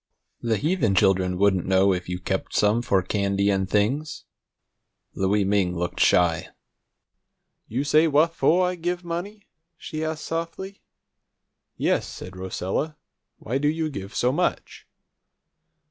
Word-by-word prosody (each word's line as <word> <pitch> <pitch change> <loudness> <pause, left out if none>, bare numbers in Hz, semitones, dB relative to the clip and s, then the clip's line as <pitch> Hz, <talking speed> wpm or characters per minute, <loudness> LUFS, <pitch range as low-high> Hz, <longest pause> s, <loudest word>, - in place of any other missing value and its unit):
The 115 -2 0
heathen 145 - +1
children 95 -1 +2
wouldn't 95 -2 +2
know 95 +1 +4
if 90 -1 -4
you 90 - -2
kept 95 +1 -3
some 105 +3 +3
for 100 -6 +1
candy 100 +1 +1
and 95 -1 0
things." 130 +10 0 0.9
Louie 100 +2 +1
Ming 95 -2 +1
looked 90 +1 -3
shy. 85 -2 +3 1.2
"You 125 +5 -2
say 155 +3 +4
wha' 150 +1 +5
fo' 165 +1 +2
I 180 0 +1
give 175 +1 -3
money?" 185 +5 -6 0.3
she 155 -1 -5
asked 155 -1 -3
softly. 170 +4 -5 1.0
"Yes," - - +1
said 90 +1 -9
Rosella. 95 - -3 0.4
"Why 125 +5 -3
do 145 - +1
you 155 0 -1
give 100 -4 -7
so 125 - +2
much?" 175 +6 -2
110 Hz, 135 wpm, -24 LUFS, 95-160 Hz, 1.2 s, wha